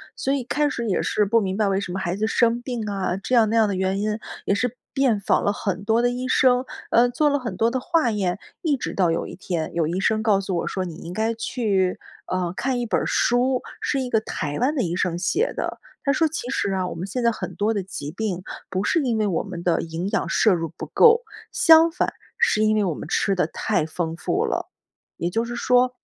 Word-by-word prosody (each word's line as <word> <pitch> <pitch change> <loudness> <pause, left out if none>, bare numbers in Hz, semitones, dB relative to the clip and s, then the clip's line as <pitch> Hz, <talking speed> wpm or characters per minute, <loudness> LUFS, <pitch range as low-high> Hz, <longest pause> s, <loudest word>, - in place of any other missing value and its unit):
所 270 - -1
以 275 -3 -1
开 295 +4 0
始 235 -4 -3
也 190 - +1
是 210 - +1
不 230 +3 +3
明 190 -3 -2
白 210 0 +1
为 195 0 +1
什 190 -3 -5
么 190 - -3
孩 175 0 -2
子 215 +2 0
生 235 +1 +2
病 240 -4 -4
啊， 195 -3 -1
这 225 +6 -1
样 225 -3 +5
那 225 - 0
样 225 -2 +4
的 200 - -1
原 190 +1 0
因， 210 +1 -1 0.3
也 200 - +2
是 245 +3 -1 0.2
遍 255 -6 +2
访 200 - +1
了 205 - +2
很 195 -2 -3
多 225 +2 +3
的 245 - +3
医 250 +1 -3
生， 255 0 +3 0.3
呃， 240 +1 +5
做 295 +5 +2
了 285 - +1
很 250 -3 -5
多 230 +1 +2
的 260 - -1
化 320 -5 +1
验。 195 -3 -1 0.2
一 315 -5 +2
直 260 - -4
到 180 -3 +2
有 165 - -1
一 - - -8
天， 175 -3 -3
有 165 -2 +1
医 180 +3 -1
生 215 +2 +1
告 210 -3 +3
诉 190 -2 -2
我 - - -2
说， 190 - -2
你 170 -3 -7
应 170 +2 -8
该 220 +3 0
去， 200 -5 0 0.3
呃， 180 -1 -1
看 255 -1 -1
一 240 - -1
本 220 - +1
儿 - - -2
书， 250 +1 +2 0.2
是 275 - 0
一 255 - -3
个 225 - +3
台 150 -8 -4
湾 270 +5 +1
的 260 - +1
医 175 -2 -2
生 180 -2 0
写 395 - 0
的。 - - -3 0.2
他 280 - +2
说 320 +4 +3
其 300 -5 -5
实 200 -7 0
啊， 185 -1 0
我 - - -5
们 175 +4 -5
现 245 +5 -3
在 235 - +4
很 - - -6
多 215 +2 +1
的 200 - -1
疾 150 -5 -6
病 190 -2 -3 0.3
不 185 +1 -1
是 330 - +2
因 235 -4 0
为 215 - +1
我 190 -5 0
们 180 -4 -7
的 170 -2 +2
营 165 +3 -4
养 - - 0
摄 215 - +4
入 165 -3 -2
不 - - -5
够， 465 +1 +5 0.3
相 325 0 +6
反， 350 +2 -1 0.2
是 455 - +3
因 215 0 +3
为 210 - +2
我 180 -5 0
们 - - -7
吃 200 - +1
得 180 -4 +1
太 160 - -1
丰 160 +1 -3
富 - - 0
了， - - -2 0.5
也 170 - -1
就 225 +5 -1
是 240 +1 -5
说 250 +1 +2
215 Hz, 275 characters per minute, -23 LUFS, 185-245 Hz, 0.5 s, 相